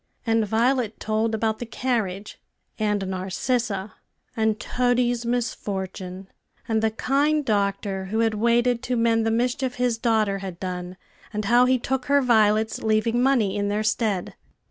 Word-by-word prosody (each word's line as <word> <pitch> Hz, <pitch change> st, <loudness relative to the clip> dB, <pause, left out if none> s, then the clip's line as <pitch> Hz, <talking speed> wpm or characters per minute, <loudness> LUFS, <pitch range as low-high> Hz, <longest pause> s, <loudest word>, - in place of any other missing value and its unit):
And 225 Hz, -2 st, +2 dB
Violet 230 Hz, +1 st, +1 dB
told 220 Hz, +1 st, 0 dB
about 220 Hz, 0 st, -1 dB
the 240 Hz, -, -4 dB
carriage, 215 Hz, -6 st, -3 dB, 0.4 s
and 210 Hz, -2 st, 0 dB
Narcissa, 195 Hz, +2 st, -2 dB, 0.4 s
and 220 Hz, -2 st, +1 dB
Toady's 245 Hz, -1 st, 0 dB
misfortune, 190 Hz, -5 st, -3 dB, 0.4 s
and 220 Hz, -1 st, +1 dB
the 220 Hz, -, +2 dB
kind 285 Hz, +6 st, +1 dB
doctor, 200 Hz, -2 st, -1 dB
who 220 Hz, +4 st, -1 dB
had 225 Hz, -1 st, +2 dB
waited 235 Hz, +2 st, +2 dB
to 250 Hz, -1 st, -2 dB
mend 225 Hz, -1 st, +2 dB
the -, -, +3 dB
mischief 250 Hz, +3 st, 0 dB
his 245 Hz, -2 st, 0 dB
daughter 215 Hz, -4 st, +1 dB
had 190 Hz, -3 st, -7 dB
done, 180 Hz, -1 st, -5 dB, 0.3 s
and 210 Hz, -1 st, -3 dB
how 240 Hz, +4 st, +5 dB
he 255 Hz, 0 st, +3 dB
took 260 Hz, +1 st, -2 dB
her 285 Hz, 0 st, +4 dB
violets, 220 Hz, -2 st, +3 dB
leaving 220 Hz, +2 st, +1 dB
money 250 Hz, -7 st, +2 dB
in 205 Hz, 0 st, -1 dB
their 210 Hz, +1 st, 0 dB
stead. 215 Hz, -4 st, -1 dB
225 Hz, 150 wpm, -24 LUFS, 205-245 Hz, 0.4 s, how